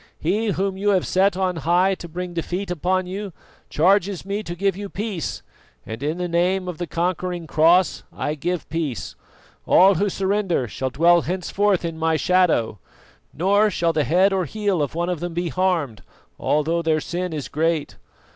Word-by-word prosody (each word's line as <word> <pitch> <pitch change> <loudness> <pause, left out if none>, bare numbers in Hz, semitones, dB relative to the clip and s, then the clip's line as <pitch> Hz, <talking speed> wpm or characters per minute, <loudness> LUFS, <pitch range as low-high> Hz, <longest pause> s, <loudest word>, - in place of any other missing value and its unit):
"He 205 +8 0
whom 195 -1 -1
you 205 +2 0
have 190 -3 +2
set 190 0 +2
on 185 -2 0
high 175 +5 +2
to 175 -2 -8
bring 180 +2 -5
defeat 175 +3 -3
upon 185 +2 0
you 195 +1 -6 0.4
charges 190 +2 +2
me 200 +2 -2
to 175 -4 -6
give 195 +1 0
you 200 +1 -6
peace, 200 -4 -4 0.4
and 110 +3 -7
in 150 +4 -2
the 180 0 -2
name 180 +2 +1
of 180 -2 -5
the 175 - -3
conquering 175 +1 -2
Cross 165 +4 +3
I 150 - -3
give 175 +3 -3
peace. 150 -6 -3 0.5
All 195 +2 +6
who 200 +3 0
surrender 190 -8 0
shall 130 +4 -3
dwell 170 +6 +4
henceforth 190 +2 0
in 165 -1 -4
my 160 0 +1
shadow, 165 - +2 0.5
nor 200 +5 +3
shall 170 -3 0
the 155 -1 +1
head 185 +8 +3
or 190 -2 0
the - - -12
heel 205 -6 0
of 145 +1 -2
one 170 +1 -1
of 180 -3 -2
them 175 0 -5
be 175 0 -1
harmed, 160 - -1 0.4
although 160 +3 +1
their 160 -1 +1
sin 180 +3 -4
is 150 -3 -4
great. 160 0 -1
175 Hz, 185 wpm, -22 LUFS, 160-190 Hz, 0.5 s, All